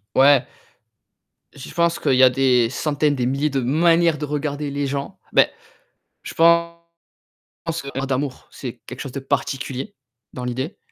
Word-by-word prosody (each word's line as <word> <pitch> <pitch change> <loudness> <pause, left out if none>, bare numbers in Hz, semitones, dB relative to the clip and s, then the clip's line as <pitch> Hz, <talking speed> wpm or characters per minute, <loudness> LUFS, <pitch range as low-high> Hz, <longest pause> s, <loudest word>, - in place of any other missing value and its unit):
Ouais. 135 -1 +6 1.1
Je 140 - -9
pense 170 0 +1
qu'il - - +1
y 130 +1 +5
a 130 - +9
des 125 -2 +3
centaines, 145 +2 0
des 125 -2 -1
milliers 140 +4 0
de 135 - 0
manières 165 +5 +3
de 150 - -3
regarder 145 0 -3
les 140 0 -2
gens. 140 0 -4
Beh, - - +5 0.7
je - - -8
pense 170 0 +3 1.0
qu'on 140 - -7
parle 135 +1 -3
d'amour, 135 0 -3
c'est 120 -3 -8
quelque - - -8
chose 135 - -6
de 135 - -5
particulier 135 +6 -3 0.4
dans 125 - -6
l'idée. 130 +5 -4
140 Hz, 160 wpm, -21 LUFS, 130-150 Hz, 1.1 s, a